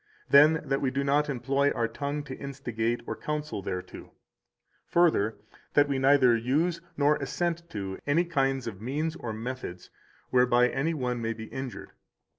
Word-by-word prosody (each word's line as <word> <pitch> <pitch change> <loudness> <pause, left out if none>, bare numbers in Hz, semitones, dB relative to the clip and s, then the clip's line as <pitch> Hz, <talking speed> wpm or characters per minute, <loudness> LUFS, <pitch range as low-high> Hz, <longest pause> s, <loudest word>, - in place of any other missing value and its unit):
Then, 150 +3 +7
that 135 0 0
we 135 - +1
do 140 +2 -1
not 145 +2 +2
employ 135 +2 +1
our 115 -4 0
tongue 145 +3 -4
to 140 -2 -7
instigate 120 -4 -3
or - - -4
counsel 150 -7 -4
thereto. 90 -1 -6 0.8
Further, 135 -12 +3 0.4
that 145 0 +5
we 140 -2 0
neither 135 -3 +5
use 155 +9 0 0.2
nor 145 +1 +3
assent 170 -1 -2
to 95 -2 -5
any 160 +5 +3
kind 135 -5 0
of 105 -4 -6
means 150 +7 -2
or 120 -9 -5
methods 110 -5 -6 0.4
whereby 125 0 +4
any 155 +6 -1
one 125 -4 -2
may 115 0 -1
be 110 -1 -8
injured. 130 +2 -7
135 Hz, 160 wpm, -28 LUFS, 120-150 Hz, 0.8 s, Then